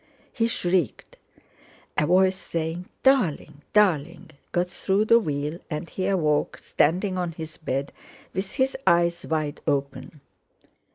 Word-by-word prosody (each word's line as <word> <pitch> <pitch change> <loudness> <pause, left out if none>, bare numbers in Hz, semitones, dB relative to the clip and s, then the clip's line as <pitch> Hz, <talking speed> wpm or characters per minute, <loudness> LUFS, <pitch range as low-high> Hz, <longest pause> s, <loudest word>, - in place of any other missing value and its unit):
He 230 -1 +1
shrieked. 180 - -1 0.8
A 150 - +2
voice 185 +1 +4
saying: 165 0 -4 0.2
"Darling, 205 - +2
darling!" 175 -4 +2 0.2
got 175 +1 0
through 195 +3 +1
the 230 +1 +6
wheel, 150 -3 -3
and 150 0 -4
he 185 0 -2
awoke, 155 -7 +1
standing 185 +5 +1
on 175 -2 -2
his 160 -1 -8
bed, 140 -3 -3 0.4
with 190 +1 -3
his 265 -1 +1
eyes 170 -1 +3
wide 155 -2 -2
open. 140 0 -2
170 Hz, 125 wpm, -25 LUFS, 150-190 Hz, 0.8 s, the